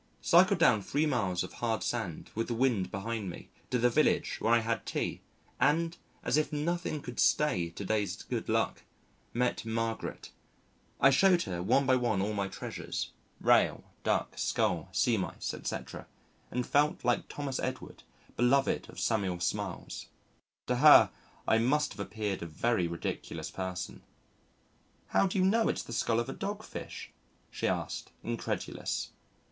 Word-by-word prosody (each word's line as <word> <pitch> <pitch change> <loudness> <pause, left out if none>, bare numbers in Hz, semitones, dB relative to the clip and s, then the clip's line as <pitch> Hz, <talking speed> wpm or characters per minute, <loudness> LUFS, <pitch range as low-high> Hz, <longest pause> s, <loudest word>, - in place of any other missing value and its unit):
Cycled - - +6
down 110 - +5
three 145 +9 0
miles 100 - 0
of 90 - -8
hard 115 -2 -1
sand 110 -10 -3
with 115 +1 -2
the 120 - -2
wind 115 -6 +1
behind 110 0 -3
me 85 - -10 0.2
to 125 - +1
the 120 0 +4
village 155 +6 +2
where 115 - +2
I 120 - +7
had 115 0 -1
tea - - -3 0.4
and 165 +4 +2 0.3
as - - +2
if 155 - +1
nothing 155 0 -1
could 125 -1 -7
stay 95 - +3
to 90 +4 -7
day's 105 -3 -1
good - - -4
luck - - +1 0.5
met 125 +1 0
Margaret. 115 0 -3 0.7
I 135 - +7
showed 180 +5 +5
her 90 -2 -4
one 135 +9 +3
by 130 0 +4
one 120 -5 +1
all 105 +3 0
my 100 -1 -1
treasures - - -5 0.3
Rail, - - +4 0.2
Duck, - - 0
Skull, 85 +1 0
Sea 100 +7 +2
Mice, 95 - -3
etc., - - -5 0.4
and 125 0 -2
felt 145 -2 +2
like 120 -1 +1
Thomas 140 -3 -3
Edward, 130 0 -5 0.3
beloved 135 +3 +2
of - - -9
Samuel 100 -6 0
Smiles. 95 +1 -3 0.6
To - - 0
her - - +8 0.4
I 110 - +4
must 150 +5 +2
have 100 - -15
appeared 105 -1 -3
a 85 - -4
very 90 +3 +1
ridiculous 85 0 -4
person. 95 -1 -5 1.1
"How 195 - +3
do 190 - -2
you 185 - +4
know 225 +4 +3
it's - - -1
the 120 - -8
skull 115 -1 +1
of 120 - -1
a 135 - -4
dog 205 +1 -4
fish?" - - -8 0.4
she - - -2
asked, - - -3
incredulous. - - -3
115 Hz, 160 wpm, -31 LUFS, 100-140 Hz, 1.1 s, her